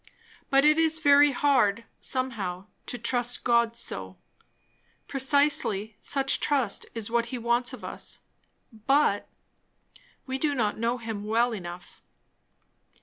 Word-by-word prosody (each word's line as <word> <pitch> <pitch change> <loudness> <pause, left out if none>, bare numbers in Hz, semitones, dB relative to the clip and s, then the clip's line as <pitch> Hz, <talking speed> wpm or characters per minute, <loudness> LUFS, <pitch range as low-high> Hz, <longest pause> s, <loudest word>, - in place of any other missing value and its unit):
But 275 +1 +4
it 305 +1 +5
is 320 -1 +3
very 290 -2 +6
hard, 245 -6 +2 0.2
somehow, 210 -8 -3 0.2
to 245 - -3
trust 245 +1 -1
God 235 -1 +2
so. 95 - -5 0.9
Precisely 265 -6 +1
such 275 -1 0
trust 265 -8 0
is 225 -1 -3
what 235 0 +1
he 250 - -5
wants 235 +1 +1
of - - -10
us; - - -6 0.7
but 275 -7 +3 1.0
we 265 0 -4
do 290 -1 0
not 215 -4 -1
know 235 +2 0
him 225 -3 -5
well 230 +3 +1
enough! 175 -3 -9
240 Hz, 125 wpm, -27 LUFS, 220-275 Hz, 1.0 s, very